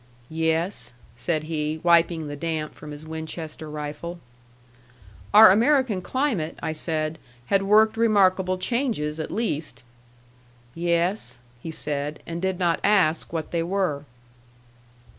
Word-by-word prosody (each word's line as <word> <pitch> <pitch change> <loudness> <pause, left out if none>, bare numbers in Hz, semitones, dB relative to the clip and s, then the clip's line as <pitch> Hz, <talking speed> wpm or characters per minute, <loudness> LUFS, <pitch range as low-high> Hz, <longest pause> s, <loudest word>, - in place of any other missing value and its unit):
"Yes," 160 -2 -1 0.2
said 150 +7 -1
he, 155 0 -2
wiping 170 -2 +3
the 145 - -5
damp 155 0 -3
from 150 - -11
his 150 +1 -9
Winchester 160 0 -6
rifle. 150 +3 -6 1.1
Our 210 -2 +9
American 235 -2 +3
climate, 230 - -1
I - - -1
said, 155 0 -3 0.3
had 195 - +5
worked 215 +3 +4
remarkable 190 -4 +3
changes, 185 - -1
at 155 - -4
least. 160 - -3 0.9
"Yes," 170 +4 -1 0.2
he 165 - -6
said; 150 -1 -3
and 170 0 -5
did 190 -1 -1
not 175 -2 +1
ask 185 -6 +2
what 160 -2 -4
they 170 - 0
were. 170 -5 -1
165 Hz, 125 wpm, -24 LUFS, 155-195 Hz, 1.1 s, Our